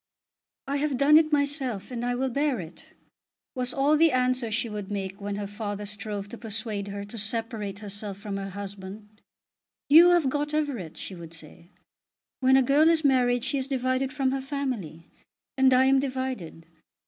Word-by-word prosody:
"I 280 +1 0
have 285 -2 0
done 285 +3 +5
it 315 -1 0
myself, 280 -8 0
and 240 -1 -4
I 245 0 0
will 260 +1 -1
bear 280 -1 0
it," 170 -1 -10 0.7
was 250 -1 -2
all 280 +3 +3
the 325 +1 +5
answer 255 -1 +1
she 225 +2 -1
would 210 -2 -6
make 195 0 -4
when 200 0 -3
her 205 0 -4
father 205 0 -5
strove 210 -1 -5
to 235 - -9
persuade 215 -2 -3
her 200 0 -5
to 220 +3 -7
separate 215 -2 -2
herself 205 -1 -6
from 200 -1 -5
her 195 0 -5
husband. 200 +2 -9 0.7
"You 330 +4 +9
have 345 -5 +4
got 295 +2 -1
Everett," 260 - -2
she - - -6
would 165 -2 -9
say. 165 +2 -11 0.7
"When 265 0 +5
a 265 - +5
girl 290 +5 +4
is 325 -1 +2
married 245 -3 +3
she 275 +1 0
is 260 - -3
divided 260 0 0
from 265 -2 0
her 270 0 -2
family; 255 - -4 0.5
and 265 -1 +4
I 255 +1 +5
am 270 0 +4
divided." 260 - -4
245 Hz, 185 wpm, -27 LUFS, 205-270 Hz, 0.7 s, You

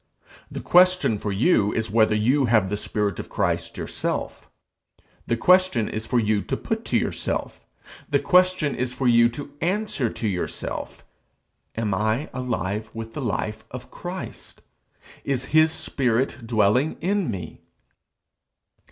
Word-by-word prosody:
The - - -6
question 180 - +4
for 105 - -3
you 105 - +3
is 110 0 -2
whether 110 -1 +4
you 130 +6 +2
have 110 -5 +2
the - - +1
spirit 105 -2 -2
of - - -7
Christ - - -1
yourself. - - -4 0.8
The 115 - +1
question 180 - +4
is 110 +1 -4
for 125 - +2
you 105 -2 +1
to - - -3
put 225 +1 -3
to - - +1
yourself, - - -3 0.4
the - - +3
question 180 -5 +3
is 125 0 -2
for 130 0 0
you 120 -1 +5
to 140 +4 -8
answer 185 - 0
to 110 - -3
yourself: 90 -3 -4 0.7
Am 110 -3 -1
I 110 +8 -1
alive 110 -4 -3
with 115 0 -6
the 150 - -5
life 110 -2 -3
of 125 0 -9
Christ? 180 +1 -8 0.6
Is 135 -2 -1
his 155 0 +6
spirit 125 -4 -1
dwelling 110 +6 +2
in 190 -1 0
me? 90 -7 -6
120 Hz, 145 wpm, -24 LUFS, 110-150 Hz, 0.8 s, his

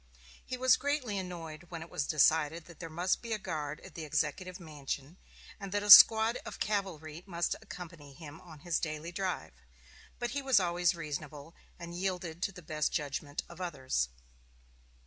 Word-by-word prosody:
He 255 - -5
was 255 -1 +5
greatly 280 -8 -1
annoyed 170 -3 -7
when 165 -2 -6
it 165 - -13
was 155 -5 -2
decided 155 +1 +3
that 170 - -14
there 165 - -6
must 175 +4 0
be 230 -1 -3
a - - 0
guard 155 -6 -4
at 190 - -12
the 165 - -6
Executive 180 +4 -2
Mansion, 150 0 -6 0.4
and 195 -2 -7
that 205 +1 0
a 205 - +4
squad 220 +3 +10
of - - -8
cavalry 170 -7 -2
must 170 -2 -1
accompany 165 -6 -10
him 155 0 -11
on 160 -4 -13
his 175 -2 0
daily 155 +1 -4
drive; 175 - -3 0.6
but 240 0 -3
he 285 - -2
was 265 -5 +4
always 175 -1 +1
reasonable, 150 -1 -6 0.2
and 170 0 -8
yielded 180 -2 -3
to 195 - 0
the 180 -2 -12
best 155 -1 -1
judgment 145 -1 -3
of 170 +1 -11
others. 130 - -1
170 Hz, 175 wpm, -32 LUFS, 155-190 Hz, 0.6 s, squad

